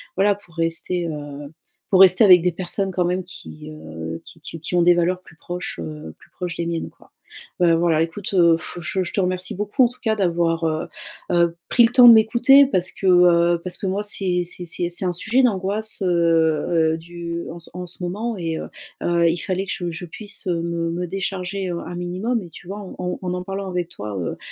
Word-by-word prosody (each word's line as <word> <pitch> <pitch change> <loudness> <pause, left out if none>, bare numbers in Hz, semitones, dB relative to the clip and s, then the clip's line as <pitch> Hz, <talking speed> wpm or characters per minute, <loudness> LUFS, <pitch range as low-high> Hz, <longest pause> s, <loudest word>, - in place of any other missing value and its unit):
voilà, 200 +2 +3
pour 175 -5 -21
rester, 165 +1 -1
heu, 145 -2 -7 0.4
pour 190 -1 +6
rester 185 +2 +7
avec 180 -4 +8
des 180 - +2
personnes 190 +3 0
quand 180 -1 0
même 180 +1 -1
qui, 155 -3 -11
heu, 80 - -7
qui 165 - -15
qui 165 +1 -8
qui 165 +3 -4
ont 175 - +4
des 175 - +6
valeurs 180 +2 0
plus 160 - -18
proches, 175 - -6
heu, 80 0 -8
plus - - -21
proches 180 -2 -5
des 170 - -3
miennes 165 -1 -3
quoi. - - -24 0.5
Bah, 170 -2 +4
voilà 165 -1 +2
écoute, 175 +5 -4
heu, 170 -3 +5
f 165 - -9
je 185 +3 -2
je 175 - -6
te - - -1
remercie 185 0 -1
beaucoup 210 +7 +1
en - - +1
tout 250 - -15
cas 220 -1 +1
d'avoir, 170 -4 0
heu 155 0 -1 0.4
heu, 170 -1 +2
pris 240 - +5
le 230 - 0
temps 250 -1 +8
de 235 - +11
m'écouter 240 +5 +6
parce 185 -9 0
que, - - -7
heu, 175 -1 +5
parce 180 - -5
que - - -6
moi 195 +2 -1
c'est 185 -4 0
c'est 180 +1 -6 0.3
c'est 175 +2 -2
un 180 - +1
sujet 230 +9 +1
d'angoisse, 210 -1 0
heu - - +1 0.9
heu, - - -5
du 170 0 -6 0.3
en 180 0 -6
ce 175 - -7
moment 210 +5 -3
et 165 -2 -3
heu - - -6 0.4
heu, 170 -1 +3
il 165 - 0
fallait 190 +2 -2
que - - -3
je 175 -2 -4
je 165 +2 -6
puisse 205 +6 -6
me 170 -1 -1
me 175 +2 -3
décharger, 190 +1 -3
heu, 170 -1 -3
un 175 +1 -7
minimum 185 +7 -2
et 175 - -11
tu 170 - -14
vois, 200 +3 -6
en 180 -2 -5
en 180 -1 -3
en 180 - -4
parlant 195 0 -5
avec 180 -2 -3
toi, 105 - -7
heu 85 -3 -4
180 Hz, 225 wpm, -21 LUFS, 170-195 Hz, 0.9 s, de